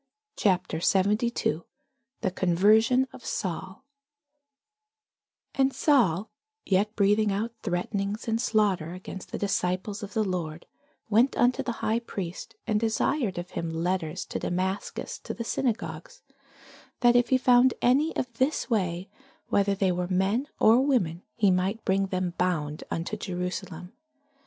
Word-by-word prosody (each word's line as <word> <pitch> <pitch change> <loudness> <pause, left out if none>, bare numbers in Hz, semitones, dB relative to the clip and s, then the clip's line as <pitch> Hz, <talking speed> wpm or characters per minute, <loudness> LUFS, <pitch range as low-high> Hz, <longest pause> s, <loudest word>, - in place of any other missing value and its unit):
CHAPTER 185 -5 +1
72 200 -2 +1 0.6
THE 190 - 0
CONVERSION 215 +9 +3
OF - - -12
SAUL 190 +5 -4 1.7
AND 270 0 +2
Saul, 220 - +2 0.3
yet 205 +3 +1
breathing 205 +1 +3
out 215 +4 -1
threatenings 200 +3 -2
and 225 0 0
slaughter 200 -9 +1
against 185 +1 -9
the - - -3
disciples 195 +1 -1
of 205 -1 -8
the 220 - +2
Lord, 170 -5 -4 0.5
went 235 +6 +4
unto 245 +1 +3
the 240 - -2
high 220 +2 +2
priest, 200 -1 -6
and 215 -2 +1
desired 225 - 0
of 175 +1 -5
him 165 - -3
letters 170 +1 -2
to - - -4
Damascus 190 +2 -3
to - - -6
the 235 - -4
synagogues, 215 -10 -3 0.8
that 240 -1 +5
if 245 -1 +4
he 260 - +5
found 250 0 +5
any 280 +6 +2
of 250 -2 -3
this 265 0 0
way, 185 -4 0 0.4
whether 200 0 +2
they 195 -1 +1
were 180 0 -1
men 195 +9 +1
or 230 +4 +6
women, 190 - +1
he 205 -4 +3
might 190 +5 0
bring 195 0 +2
them 185 -2 -2
bound 155 -5 -1
unto 165 +6 -3
Jerusalem. 180 -2 -5
200 Hz, 135 wpm, -27 LUFS, 180-230 Hz, 1.7 s, or